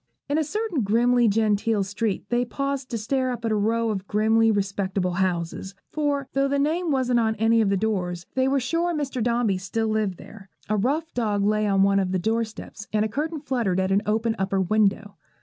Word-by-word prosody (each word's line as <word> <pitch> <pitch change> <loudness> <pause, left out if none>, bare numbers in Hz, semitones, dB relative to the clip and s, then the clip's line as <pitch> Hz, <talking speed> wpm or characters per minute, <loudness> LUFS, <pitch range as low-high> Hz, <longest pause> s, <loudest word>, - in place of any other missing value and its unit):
In 290 +2 +1
a - - +2
certain 395 - -2
grimly 235 +3 +3
genteel 215 0 +1
street 200 +1 -2
they 245 0 +2
paused 275 +2 -3
to 235 - -2
stare 255 +4 -1
up 240 -2 -4
at 225 - 0
a - - +2
row 225 +2 +1
of 195 -2 -4
grimly 220 +2 +3
respectable 195 -2 -1
houses; 185 +1 -2 0.2
for, 285 -3 -1
though 275 0 +2
the 280 +1 0
name 320 +5 0
wasn't 255 -4 +2
on 220 -1 +1
any 225 +1 +3
of 210 - +2
the 200 - +2
doors, 180 -4 -2
they 260 0 +1
were 275 +1 +2
sure 335 +6 -1
Mr. 275 -4 -3
Dombey 235 -4 +1
still 220 +4 -2
lived 215 -4 -1
there. 200 -3 -13 0.2
A 215 - +2
rough 290 +10 -1
dog 210 -4 0
lay 215 0 +2
on 195 -1 +3
one 195 0 +3
of 190 -1 -1
the - - +2
doorsteps, 220 +1 -3
and 215 0 +1
a - - +1
curtain 300 +7 -3
fluttered 235 -10 0
at 190 0 0
an 195 +1 +3
open 220 +1 +1
upper 195 0 0
window. 205 0 +1
220 Hz, 210 wpm, -24 LUFS, 200-255 Hz, 0.2 s, grimly